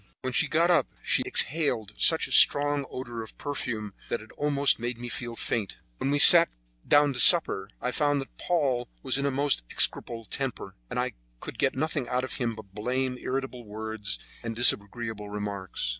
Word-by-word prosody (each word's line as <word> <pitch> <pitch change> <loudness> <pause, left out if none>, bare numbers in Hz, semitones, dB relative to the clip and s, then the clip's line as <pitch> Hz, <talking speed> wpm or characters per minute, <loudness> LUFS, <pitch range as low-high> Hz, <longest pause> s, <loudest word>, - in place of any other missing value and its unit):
When 130 -1 -4
she - - +1
got 170 +3 +2
up 175 - +2 0.2
she - - +2
exhaled 125 -9 -1
such 160 - +4
a - - -13
strong 145 -1 +5
odor 120 -3 -7
of 110 - -12
perfume 110 -7 -5 0.2
that 120 - -2
it 110 - -15
almost 145 -2 +1
made 120 +1 -4
me 120 +1 -7
feel 120 -1 -6
faint. 110 -4 -3 0.2
When 135 - -2
we 145 - +1
sat 170 +3 +9 0.4
down 145 -1 +4
to 125 - -5
supper, 100 - +6
I 125 - -3
found 145 +1 0
that 135 - -9
Paul 135 -9 -1
was 135 0 +1
in 140 - -1
a - - +1
most 140 - 0
execrable 115 -1 -1
temper, 125 -6 -5
and - - -4
I - - -2 0.3
could - - -9
get 135 - +1
nothing 145 -2 -2
out 125 0 -1
of 130 - -5
him 120 -3 -2
but 100 -3 -13
blame, 125 +4 -2
irritable 130 -2 -5
words, 110 - -5 0.2
and 115 -1 -6
disagreeable 110 -2 +1
remarks. 100 -6 -5
125 Hz, 190 wpm, -26 LUFS, 110-140 Hz, 0.4 s, sat